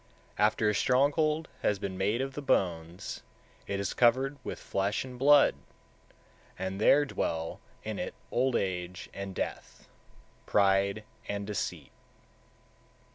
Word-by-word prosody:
150. - - +2
After 105 0 +3
a - - +2
stronghold 150 +7 +2
has 105 - +2
been 95 -1 -4
made 105 +6 +1
of 135 0 -3
the 145 - -5
bones, 85 - -1 0.5
it 100 - -2
is 100 -1 -2
covered 130 +4 +3
with - - -5
flesh 100 +5 -1
and 125 -1 -9
blood, 145 +1 +6 1.0
and 95 +2 -4
there 145 +6 +6
dwell 80 - -2 0.2
in - - -4
it - - -4 0.2
old 130 0 +2
age 90 0 -2
and 100 -1 -6
death, - - -5 0.6
pride 100 +1 +3 0.3
and 100 0 -2
deceit. 100 -2 -4
105 Hz, 130 wpm, -30 LUFS, 95-130 Hz, 1.0 s, blood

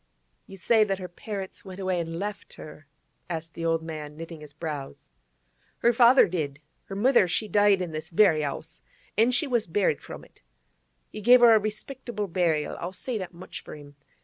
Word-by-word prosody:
'You 195 - -11
say 220 +4 +4
that 195 -2 -1
her 185 -1 -6
parents 195 +2 -7
went 190 -1 -10
away 185 -2 -1
and 165 0 -4
left 205 +2 -5
her?' 150 -1 -12 0.4
asked 165 -1 -4
the 165 - -6
old 165 -1 +1
man, 150 -2 -7
knitting 165 -1 -8
his 150 -1 -11
brows. 145 - -7 0.7
'Her 235 - +3
father 240 +2 +6
did. 150 -5 -3 0.3
Her 195 - -7
mother, 235 -1 +4
she 175 +5 -1
died 205 -3 +3
in 175 - -5
this 155 +1 -6
very 165 -4 +4
'ouse, 155 +3 -6 0.3
an' 225 +4 +4
she 250 +5 +2
was 240 -7 0
buried 170 -3 +1
from - - -10
it. - - -25 0.7
He 215 - -7
gave 245 +3 +7
her 235 -1 +8
a 220 - +6
respectable 215 +1 -5
burial, 165 -4 0
I'll 175 +2 -5
say 225 +4 -3
that 180 -2 -7
much 175 - -9
for - - -9
him. 145 -1 -13
185 Hz, 195 wpm, -26 LUFS, 160-215 Hz, 0.7 s, her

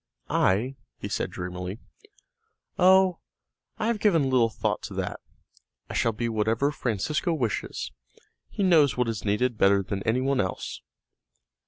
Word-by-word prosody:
"I?" 120 +8 +2 0.2
he - - -5
said - - -2
dreamily. 90 +2 -5 1.0
"Oh, 185 -1 +5 0.6
I 215 - -2
have 230 -1 0
given 165 -11 +3
little 120 -3 +4
thought - - -2
to - - -8
that, - - -3 0.7
I - - -5
shall 115 - +2
be 115 +2 -3
whatever 115 +5 +1
Francesco 150 - -1
wishes; 120 - -2 0.6
he 200 - -2
knows 160 -8 +4
what 125 -1 +1
is 115 -2 -3
needed 110 +3 0
better 100 0 +4
than 100 +1 -4
any 115 +4 +1
one 135 0 +2
else." 95 -1 -4
120 Hz, 145 wpm, -26 LUFS, 105-150 Hz, 1.0 s, Oh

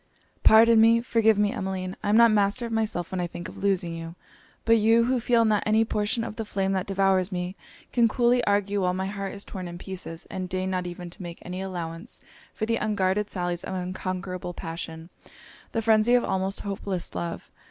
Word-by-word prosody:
'Pardon 225 +1 +7
me! 230 +1 +6
forgive 225 -3 +3
me, 205 0 +2
Emmeline! 190 -4 -4
I 205 - -2
am 210 - +5
not 235 -1 +7
master 210 +3 +2
of 230 - -6
myself 220 -6 -1
when 185 - -2
I 175 - -1
think 175 0 -7
of - - -10
losing 190 -4 0
you! 165 0 -7 0.5
But 230 0 +5
you, 225 +2 +4
who 250 +1 +1
feel 235 0 +3
not 215 -2 +2
any 220 +1 +3
portion 220 +2 -1
of 225 - -6
the 225 - -2
flame 195 -2 -1
that 190 -2 -1
devours 195 -1 +2
me, 180 +1 -3 0.4
can 235 -2 +4
coolly 245 +2 +2
argue, 200 0 +1
while 180 0 +1
my 190 +1 -2
heart 195 0 -4
is 200 - -5
torn 185 -2 -6
in 175 0 -7
pieces; 175 -3 -7
and 185 -1 -4
deign 185 +1 -2
not 180 -1 -2
even 175 0 -7
to - - -11
make 175 -1 -7
any 180 +1 -5
allowance 175 +2 -6 0.3
for 220 - -3
the 230 +1 0
unguarded 210 -1 0
sallies 175 -2 -2
of 190 - -4
unconquerable 185 -1 -4
passion! 165 0 -6 0.6
the 225 - -1
phrenzy 220 +2 +4
of 245 - +3
almost 190 +1 -1
hopeless 195 -2 -4
love! 170 -1 -5
195 Hz, 205 wpm, -26 LUFS, 180-220 Hz, 0.6 s, Pardon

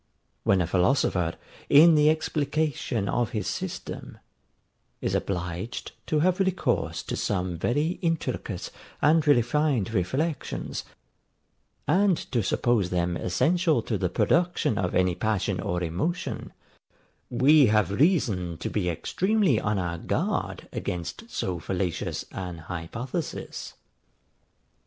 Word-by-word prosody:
When 95 -2 +3
a - - +1
philosopher, 90 - +1 0.3
in 160 +4 +8
the 150 0 +5
explication 150 -7 0
of 120 +2 0
his 105 - -2
system, - - -5 0.8
is - - -2
obliged 90 +3 -3 0.2
to 155 -1 +2
have 185 +3 +2
recourse 190 -1 0
to - - -4
some 90 -3 -1
very 145 - 0
intricate 135 - -2 0.3
and 155 +1 +3
refined 130 -4 +2
reflections, 130 - -2 1.0
and 185 +2 +4
to 120 -3 +2
suppose 105 -1 +1
them 90 -1 0
essential 160 - +2
to 110 - -2
the 90 -2 0
production 140 - +1
of 90 -2 -1
any 90 -1 +3
passion 100 0 -1
or 90 0 -2
emotion, 95 - -3 0.8
we 135 +3 +5
have 105 -2 +2
reason 100 - +1
to - - -4
be 95 -4 0
extremely 185 - +1
on 105 0 0
our 85 -2 -2
guard - - -2
against 90 - -4
so 90 - -2
fallacious 90 -1 -2
an 90 -2 -5
hypothesis. 90 - -5
115 Hz, 115 wpm, -26 LUFS, -, 1.0 s, in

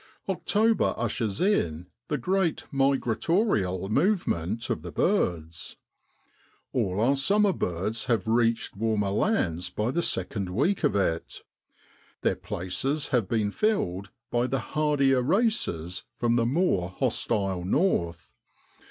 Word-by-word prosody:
October 215 +4 +1
ushers 115 -3 -2
in 90 - +1 0.2
the 150 - -1
great 190 -2 0
migratorial 135 - +1
movement 115 - 0
of - - -2
the 85 +1 -7
birds. 85 - -1 1.0
All 95 +1 0
our 125 +5 +3
summer 200 +8 +3
birds 95 - -2
have 115 -5 0
reached 115 -1 +1
warmer 105 -2 0
lands 90 - 0
by 105 +6 -1
the 170 - 0
second 95 - -1
week 145 - 0
of 145 - +2
it; 85 -5 -1 0.8
their - - +1
places 135 - -2
have 120 -6 +1
been 110 -3 0
filled 100 - 0 0.2
by 120 +1 +1
the 130 -1 -3
hardier 145 -4 +3
races 140 - 0
from 120 -1 +1
the 115 -1 +2
more 125 - +1
hostile 95 -1 -1
north. 85 - 0
115 Hz, 120 wpm, -27 LUFS, 95-155 Hz, 1.0 s, our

